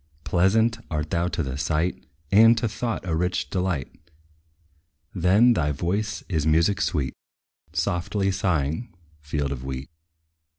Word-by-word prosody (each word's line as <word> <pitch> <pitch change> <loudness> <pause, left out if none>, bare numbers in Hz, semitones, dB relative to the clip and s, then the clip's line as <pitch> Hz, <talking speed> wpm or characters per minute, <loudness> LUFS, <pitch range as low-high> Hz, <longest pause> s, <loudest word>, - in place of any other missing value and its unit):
Pleasant 110 +6 +2
art 75 -1 -3
thou 85 +1 +1
to 85 -1 -2
the 65 0 -4
sight; 80 -1 -1 0.2
And 115 +3 +7
to 115 - 0
thought 115 -1 -3
a 80 - 0
rich 90 +2 -1
delight. 85 -4 -3 1.0
Then, 100 +8 +4
thy 75 -8 0
voice 95 +9 -2
is 80 -4 -1
music 80 +6 +3
sweet, 70 -6 -1 0.6
Softly 95 +3 0
sighing 85 - -1 0.2
field 75 -1 -3
of 65 -2 -5
wheat. 65 +1 -6
85 Hz, 130 wpm, -25 LUFS, 75-100 Hz, 1.0 s, And